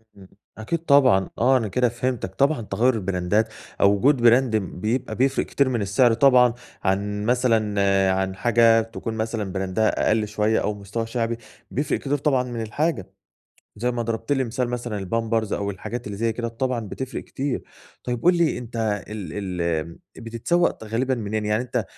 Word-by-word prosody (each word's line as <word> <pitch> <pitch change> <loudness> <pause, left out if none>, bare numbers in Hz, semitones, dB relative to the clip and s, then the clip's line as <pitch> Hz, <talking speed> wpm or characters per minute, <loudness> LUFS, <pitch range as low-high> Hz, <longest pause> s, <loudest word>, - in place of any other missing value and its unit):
إمم. 95 -1 -15 0.3
أكيد 110 +10 -2
طبعًا. 130 - +5
آه، 130 +3 +4
أنا 115 -4 -1
كده 125 +5 +1
فهمتك 120 -5 -3
طبعًا 140 +3 +2
تَغيُّر 120 +4 +1
البراندات 95 +1 0 0.3
أو 100 - +6
وجود 130 +5 +3
براند 120 0 +4
م 95 -4 -3
بيبقى 110 +2 -1
بيفرِق 135 +2 +1
كتير 140 -2 +1
من 120 -4 -1
السِّعر 110 +5 +3
طبعًا 125 -1 +5 0.3
عن 105 +2 -1
مثلًا، 115 -4 +2 0.4
عن 95 0 -3
حاجة 115 +1 +4
تكون 115 0 -6
مثلًا 110 -3 -3
براندها 95 +3 0
أقل 110 -1 +2
شويّة 105 +1 +1
أو 105 - -1
مستواها 105 +3 -4
شعبي 115 0 -2 0.3
بيفرِق 140 +2 -1
كتير 145 +1 -1
طبعًا 135 -3 +1
من 120 -2 -5
الحاجة. 110 - -2 0.6
زي 120 +4 0
ما 120 -1 -2
ضربْت 115 +2 -2
لي 135 -2 +1
مثال 125 +1 -2
مثلًا 120 -3 -3
البامبرز 110 +2 -1
أو 100 0 -1
الحاجات 115 +5 -6
اللي 105 - -5
زي 115 0 +1
كده 115 +1 -3
طبعًا 125 +1 -2
بتفرِق 130 +5 -5
كتير. 135 -1 -3 0.4
طيب 120 -1 -3
قُل 175 +1 +5
لي 170 -5 +2
أنت 120 -1 -8 0.3
ال 105 -3 -6
ال 95 -3 -4
آمم، 85 -1 -2 0.2
بتتسوّق 115 +5 0
غالبًا 125 +5 0
منين، 110 -2 -3
يعني 105 +3 +1
أنت 125 - -2
115 Hz, 175 wpm, -23 LUFS, 105-125 Hz, 0.6 s, أو